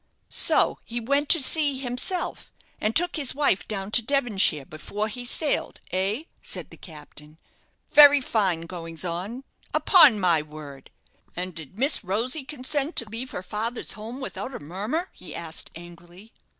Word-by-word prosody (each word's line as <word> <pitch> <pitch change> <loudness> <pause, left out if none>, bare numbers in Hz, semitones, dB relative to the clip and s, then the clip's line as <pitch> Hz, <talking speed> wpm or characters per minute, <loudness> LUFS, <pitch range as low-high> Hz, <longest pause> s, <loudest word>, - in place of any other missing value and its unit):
"So - - +3
he 235 +1 -5
went 280 +5 0
to 335 - +7
sea 285 0 +2
himself, 260 +8 0 0.3
and 215 +1 -1
took 350 0 +3
his 275 -4 +1
wife 285 -9 +2
down 200 -1 -4
to 240 - +5
Devonshire 220 - +1
before 200 +9 -5
he 245 +3 -6
sailed, 285 +4 -1
eh?" 195 - -1 0.2
said - - -5
the - - -13
captain. 150 -1 -13 0.5
"Very 290 -1 +8
fine 200 -10 0
goings 165 0 -6
on, 190 +9 -4 0.3
upon 340 - +6
my 175 -5 +3
word! 150 -3 -11 0.5
And 180 +1 -4
did 160 +2 -10
Miss 275 +2 +1
Rosy 235 - -2
consent 285 +2 -3
to 230 - +4
leave 235 +4 -6
her 180 - -6
father's 225 +5 -4
home 225 +5 -8
without 265 -1 -6
a - - -6
murmur?" 210 - -4
he 180 - -11
asked, 160 -1 -4
angrily. 175 +4 -14
215 Hz, 155 wpm, -25 LUFS, 175-270 Hz, 0.5 s, Very